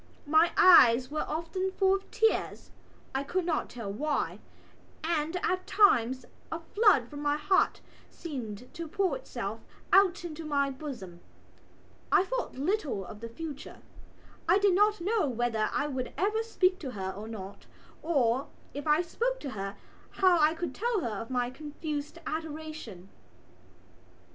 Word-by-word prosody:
My 315 Hz, +3 st, +4 dB
eyes 255 Hz, -8 st, +7 dB
were 305 Hz, -, -2 dB
often 335 Hz, +4 st, -2 dB
full 385 Hz, -1 st, +3 dB
of 390 Hz, 0 st, -3 dB
tears 445 Hz, 0 st, 0 dB, 0.4 s
(I 270 Hz, -, 0 dB
could 355 Hz, +5 st, -1 dB
not 330 Hz, -3 st, -1 dB
tell 220 Hz, -5 st, -6 dB
why) 290 Hz, +6 st, -1 dB, 0.6 s
and 325 Hz, +1 st, 0 dB
at 370 Hz, 0 st, -1 dB
times 260 Hz, -, +4 dB, 0.3 s
a 325 Hz, -, -2 dB
flood 355 Hz, -, +3 dB
from 290 Hz, +3 st, -9 dB
my 290 Hz, 0 st, +1 dB
heart 375 Hz, +7 st, +2 dB, 0.3 s
seemed 250 Hz, -, -7 dB
to 335 Hz, -1 st, -6 dB
pour 385 Hz, +3 st, 0 dB
itself -, -, -6 dB, 0.3 s
out 385 Hz, -2 st, +5 dB
into 325 Hz, -1 st, -6 dB
my 280 Hz, -2 st, +1 dB
bosom. 245 Hz, -, -8 dB, 0.9 s
I -, -, +6 dB
thought -, -, -3 dB
little 285 Hz, -, -1 dB
of 210 Hz, -, -10 dB
the 230 Hz, +1 st, -7 dB
future. 295 Hz, +3 st, -8 dB, 0.7 s
I 360 Hz, -, +6 dB
did 400 Hz, -2 st, +4 dB
not 415 Hz, 0 st, +3 dB
know 400 Hz, -2 st, +1 dB
whether 235 Hz, -3 st, 0 dB
I 290 Hz, -, 0 dB
would 260 Hz, -4 st, -4 dB
ever 425 Hz, +3 st, +1 dB
speak 380 Hz, -5 st, +1 dB
to 270 Hz, -5 st, -5 dB
her 190 Hz, -2 st, -3 dB
or 205 Hz, +3 st, -8 dB
not 200 Hz, -3 st, -8 dB, 0.3 s
or, 270 Hz, -5 st, +1 dB, 0.3 s
if 285 Hz, +2 st, -6 dB
I 300 Hz, +3 st, +4 dB
spoke -, -, -1 dB
to 275 Hz, -, -5 dB
her, 195 Hz, -2 st, -5 dB, 0.4 s
how 370 Hz, -3 st, +4 dB
I 310 Hz, +1 st, +4 dB
could 330 Hz, -4 st, -4 dB
tell 460 Hz, -, 0 dB
her 230 Hz, -, -2 dB
of 230 Hz, -, -8 dB
my 245 Hz, -1 st, 0 dB
confused 300 Hz, +2 st, -5 dB
adoration. 310 Hz, -, -6 dB
305 Hz, 155 wpm, -29 LUFS, 250-370 Hz, 0.9 s, eyes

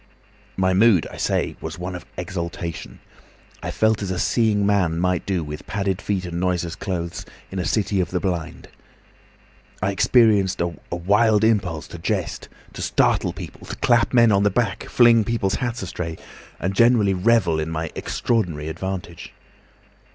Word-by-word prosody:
"My 95 Hz, 0 st, +2 dB
mood, 100 Hz, -2 st, +5 dB
I -, -, -10 dB
say, -, -, -1 dB
was -, -, -6 dB
one 90 Hz, +1 st, -5 dB
of 90 Hz, -1 st, -8 dB
exaltation. 85 Hz, -2 st, -5 dB, 0.6 s
I -, -, -4 dB
felt 110 Hz, -1 st, +1 dB
as 100 Hz, -, -3 dB
a 95 Hz, -, -2 dB
seeing 105 Hz, -1 st, +2 dB
man 95 Hz, -5 st, +2 dB
might 90 Hz, -1 st, 0 dB
do, 95 Hz, -4 st, 0 dB
with 75 Hz, 0 st, -8 dB
padded 100 Hz, -1 st, -2 dB
feet 95 Hz, -3 st, -2 dB
and 85 Hz, -1 st, -4 dB
noiseless 90 Hz, -2 st, -1 dB
clothes, 85 Hz, -3 st, -4 dB, 0.3 s
in 95 Hz, -, -4 dB
a 90 Hz, -, -2 dB
city 100 Hz, +2 st, 0 dB
of 90 Hz, -, -2 dB
the 90 Hz, -, -1 dB
blind. 90 Hz, -4 st, -4 dB, 1.1 s
I 95 Hz, +1 st, 0 dB
experienced 100 Hz, -2 st, +3 dB
a 85 Hz, 0 st, -1 dB, 0.2 s
wild 105 Hz, +5 st, +2 dB
impulse 95 Hz, -9 st, +1 dB
to -, -, -9 dB
jest, -, -, -3 dB, 0.2 s
to -, -, -7 dB
startle -, -, +2 dB
people, -, -, -10 dB
to -, -, -5 dB
clap 120 Hz, -1 st, +2 dB
men 115 Hz, -3 st, +5 dB
on 100 Hz, -1 st, +3 dB
the 105 Hz, -, +4 dB
back, 100 Hz, -2 st, -1 dB
fling 120 Hz, -2 st, +5 dB
people's 100 Hz, -3 st, -1 dB
hats 120 Hz, -3 st, -2 dB
astray, 85 Hz, -3 st, -5 dB, 0.4 s
and 95 Hz, +2 st, -1 dB
generally 115 Hz, -2 st, +4 dB
revel 90 Hz, -4 st, +2 dB
in 80 Hz, +1 st, -2 dB
my 80 Hz, 0 st, -3 dB
extraordinary 85 Hz, -10 st, -1 dB
advantage. 95 Hz, +1 st, -6 dB
95 Hz, 165 wpm, -22 LUFS, 85-105 Hz, 1.1 s, mood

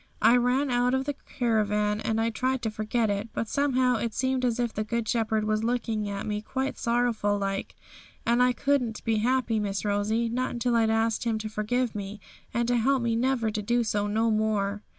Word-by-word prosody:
Well, -, -, +5 dB
I -, -, +6 dB
ran 250 Hz, +3 st, +1 dB
out 245 Hz, +1 st, +2 dB
of 265 Hz, 0 st, -1 dB
the 290 Hz, -, -1 dB
caravan, 210 Hz, -6 st, 0 dB
and 220 Hz, 0 st, -1 dB
I 225 Hz, +1 st, +1 dB
tried 255 Hz, +2 st, -1 dB
to 220 Hz, -, -1 dB
forget 215 Hz, +1 st, 0 dB
it; 200 Hz, +3 st, -3 dB
but 225 Hz, -, -2 dB
somehow 255 Hz, -2 st, +2 dB
it 225 Hz, -1 st, -3 dB
seemed 260 Hz, 0 st, 0 dB
as 245 Hz, -1 st, +1 dB
if 240 Hz, -2 st, 0 dB
the 215 Hz, -, -2 dB
Good 230 Hz, +1 st, -2 dB
Shepherd 220 Hz, -1 st, +1 dB
was 215 Hz, 0 st, 0 dB
looking 225 Hz, -3 st, -1 dB
at 200 Hz, 0 st, -4 dB
me 210 Hz, -1 st, -2 dB
quite 265 Hz, +5 st, -3 dB
sorrowful 235 Hz, -4 st, +1 dB
like; 195 Hz, -1 st, -3 dB, 0.5 s
and 235 Hz, +1 st, +3 dB
I 250 Hz, 0 st, +5 dB
couldn't 250 Hz, -4 st, 0 dB
be 225 Hz, -2 st, +1 dB
happy, 240 Hz, 0 st, +1 dB
Miss 200 Hz, -1 st, -2 dB
Rosie, 210 Hz, +3 st, +1 dB
not 250 Hz, +3 st, -1 dB
until 240 Hz, 0 st, 0 dB
I'd 225 Hz, -1 st, +3 dB
asked 225 Hz, 0 st, +1 dB
Him 225 Hz, -2 st, +1 dB
to 215 Hz, 0 st, -5 dB
forgive 225 Hz, +3 st, -1 dB
me, 205 Hz, 0 st, -6 dB, 0.3 s
and 235 Hz, 0 st, 0 dB
to 245 Hz, -, +3 dB
help 260 Hz, +2 st, +2 dB
me 230 Hz, -1 st, +1 dB
never 235 Hz, -2 st, +1 dB
to 210 Hz, 0 st, -3 dB
do 240 Hz, +3 st, +1 dB
so 205 Hz, -2 st, -1 dB
no 220 Hz, +2 st, +1 dB
more.' 210 Hz, -2 st, 0 dB
225 Hz, 215 wpm, -27 LUFS, 215-245 Hz, 0.5 s, I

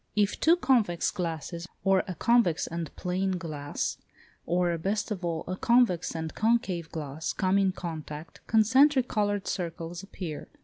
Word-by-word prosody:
If 205 Hz, -1 st, +1 dB
two 330 Hz, +2 st, +5 dB
convex 230 Hz, -, +2 dB
glasses, 170 Hz, 0 st, -4 dB, 0.2 s
or 195 Hz, -1 st, +4 dB
a 185 Hz, -, -4 dB
convex 230 Hz, -4 st, +3 dB
and 165 Hz, -2 st, -4 dB
plane 185 Hz, +1 st, -1 dB
glass, 150 Hz, -4 st, -3 dB, 0.5 s
or, 175 Hz, 0 st, +2 dB
best 205 Hz, +6 st, -1 dB
of 190 Hz, -3 st, -3 dB
all, 165 Hz, -2 st, -2 dB
a 185 Hz, -, -2 dB
convex 235 Hz, -7 st, +2 dB
and 160 Hz, -1 st, -4 dB
concave 215 Hz, -7 st, +1 dB
glass 155 Hz, 0 st, -4 dB
come 190 Hz, 0 st, +2 dB
in 195 Hz, -1 st, +3 dB
contact, 160 Hz, -3 st, -7 dB
concentric 260 Hz, +5 st, +5 dB
coloured 205 Hz, -2 st, 0 dB
circles 170 Hz, -1 st, -4 dB
appear. 185 Hz, -6 st, -7 dB
180 Hz, 145 wpm, -28 LUFS, 165-210 Hz, 0.5 s, two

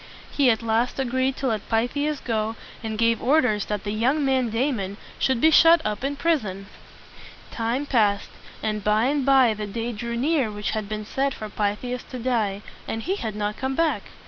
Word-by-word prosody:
He 280 Hz, -3 st, +3 dB
at 225 Hz, 0 st, +1 dB
last 230 Hz, +2 st, 0 dB
agreed 260 Hz, 0 st, 0 dB
to 270 Hz, -, -4 dB
let 215 Hz, -3 st, -3 dB
Pythias 285 Hz, +6 st, 0 dB
go, 220 Hz, -1 st, -1 dB, 0.3 s
and 220 Hz, -1 st, -4 dB
gave 230 Hz, 0 st, +2 dB
orders 250 Hz, -7 st, +2 dB
that 210 Hz, -2 st, -3 dB
the 205 Hz, -, -3 dB
young 260 Hz, +8 st, +1 dB
man 260 Hz, -3 st, +2 dB
Da 245 Hz, +6 st, +1 dB
mon 200 Hz, -4 st, -4 dB, 0.2 s
should 260 Hz, -3 st, +1 dB
be 315 Hz, +6 st, +5 dB
shut 330 Hz, +2 st, +7 dB
up 210 Hz, +2 st, -2 dB
in 280 Hz, +1 st, -1 dB
prison. 235 Hz, -, -1 dB, 0.9 s
Time 235 Hz, +5 st, -1 dB
passed, 210 Hz, -7 st, +1 dB, 0.3 s
and 215 Hz, -1 st, -2 dB
by 210 Hz, +3 st, +3 dB
and 280 Hz, +1 st, +1 dB
by 265 Hz, -4 st, +5 dB
the 210 Hz, 0 st, -5 dB
day 230 Hz, +3 st, -3 dB
drew 235 Hz, +1 st, -4 dB
near 275 Hz, -2 st, +1 dB
which 210 Hz, 0 st, -3 dB
had 215 Hz, -2 st, -3 dB
been 215 Hz, 0 st, -4 dB
set 270 Hz, +4 st, -1 dB
for 215 Hz, -, -7 dB
Pythias 210 Hz, +5 st, -2 dB
to 255 Hz, -, -8 dB
die; 220 Hz, -5 st, -1 dB, 0.2 s
and 225 Hz, 0 st, -3 dB
he 385 Hz, +3 st, -1 dB
had 220 Hz, -, -4 dB
not 210 Hz, 0 st, -2 dB
come 265 Hz, 0 st, -2 dB
back. 330 Hz, 0 st, +1 dB
230 Hz, 200 wpm, -24 LUFS, 215-270 Hz, 0.9 s, shut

